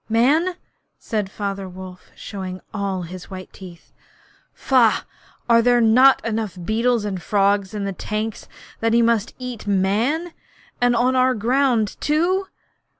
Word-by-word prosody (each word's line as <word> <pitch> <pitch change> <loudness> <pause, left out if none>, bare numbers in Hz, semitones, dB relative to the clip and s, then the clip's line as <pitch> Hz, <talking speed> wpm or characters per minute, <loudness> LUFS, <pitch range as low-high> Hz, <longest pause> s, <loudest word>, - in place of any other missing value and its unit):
'Man!' 295 +11 +2 0.4
said 210 -4 -3
Father 195 -2 -4
Wolf, 185 0 -11
showing 185 -2 -7
all 195 -3 -2
his 180 +2 -9
white 185 -1 -9
teeth. 175 -3 -13 0.6
'Faugh! 245 -5 +2 0.4
Are 230 -1 +5
there 245 +1 +4
not 245 +4 +5
enough 220 -4 -3
beetles 230 +1 +1
and 190 -3 -4
frogs 200 +1 +1
in 205 - -3
the 195 - -3
tanks 215 +3 -4 0.3
that 225 0 +1
he 235 0 +4
must 230 -2 +1
eat 250 -4 -7
Man, 220 - 0 0.5
and 245 0 +3
on 250 +2 +2
our 255 0 +3
ground 240 -1 +1
too!' 355 +6 +1
220 Hz, 140 wpm, -21 LUFS, 195-250 Hz, 0.6 s, Are